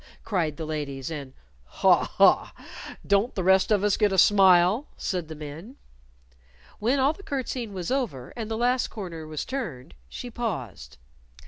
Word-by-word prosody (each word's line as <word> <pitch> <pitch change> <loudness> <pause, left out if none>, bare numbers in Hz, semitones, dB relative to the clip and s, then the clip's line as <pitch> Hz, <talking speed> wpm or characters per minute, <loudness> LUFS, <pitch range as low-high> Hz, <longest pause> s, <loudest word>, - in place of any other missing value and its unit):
cried 170 -8 -1
the 160 - -4
ladies, 145 -2 -4
and 140 -4 -6 0.3
"Haw! - - +3
Haw! - - +3 0.5
Don't 200 +4 +2
the 185 - -1
rest 190 +1 +4
of 205 -2 +3
us 205 -1 +2
get 210 -2 +2
a 190 - 0
smile?" 190 - +5
said 180 -5 -3
the 160 - -8
men. 155 - -9 1.0
When 240 +6 +1
all 275 +3 +3
the 395 - -14
curtseying 255 - -4
was 185 -1 -5
over, 175 - -2
and 225 -2 -5
the 220 - -2
last 245 +2 +1
corner 170 -7 -7
was 155 -1 -4
turned, 190 - -5 0.2
she 245 - -7
paused. 135 - -5
190 Hz, 160 wpm, -26 LUFS, 155-235 Hz, 1.0 s, smile